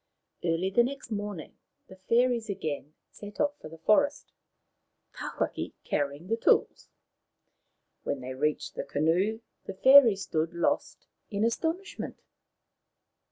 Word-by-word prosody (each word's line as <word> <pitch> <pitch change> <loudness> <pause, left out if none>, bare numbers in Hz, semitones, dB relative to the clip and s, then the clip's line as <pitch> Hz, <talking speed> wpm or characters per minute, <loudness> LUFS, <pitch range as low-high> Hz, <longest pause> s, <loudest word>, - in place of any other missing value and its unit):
Early 175 +3 0
the 240 - +5
next 265 -1 -5
morning 205 -5 -5 0.3
the 190 - -13
fairies 230 +3 +1
again 155 -5 -4 0.2
set 205 0 -11
off 290 0 0
for - - -10
the 165 - -11
forest, 285 - +2 0.8
Tawhaki - - -4
carrying 145 +3 -2
the 225 +4 -1
tools. - - +2 1.1
When 140 - -3
they 130 0 -6
reached 150 +3 -1
the - - -4
canoe 180 +9 0 0.2
the 195 - -6
fairies 240 -4 +7
stood 160 +1 -2
lost 170 - -1 0.2
in 205 +1 0
astonishment. 330 +11 -3
200 Hz, 120 wpm, -28 LUFS, 160-235 Hz, 1.1 s, fairies